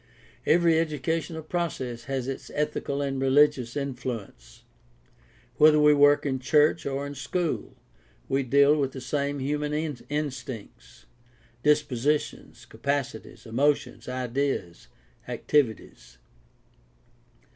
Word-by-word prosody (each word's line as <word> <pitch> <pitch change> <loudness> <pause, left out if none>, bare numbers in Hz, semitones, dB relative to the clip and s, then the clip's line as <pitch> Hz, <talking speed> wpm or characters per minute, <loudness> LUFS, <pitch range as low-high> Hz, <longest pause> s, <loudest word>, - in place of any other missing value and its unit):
Every 165 -1 +4
educational 160 +1 -2
process 135 -8 -3
has 135 -2 -3
its 135 - -5
ethical 145 -1 -1
and 135 -1 -2
religious 135 -2 +3
influence. 120 - -6 0.9
Whether 150 0 +6
we 150 0 +6
work 145 0 +5
in 130 -2 -1
church 150 +4 +3
or 140 +1 -2
in 140 - -6
school, 155 +5 -3 0.5
we 135 +1 +1
deal 140 +3 +4
with 140 -3 -1
the 135 - -6
same 140 +2 -2
human 150 +2 -2 0.4
instincts, 135 -6 -6 0.6
dispositions, 150 -1 0
capacities, 140 -1 -4
emotions, 135 +4 0
ideas, 125 - -2 0.4
activities. 110 - -1
140 Hz, 100 wpm, -26 LUFS, 130-150 Hz, 0.9 s, Whether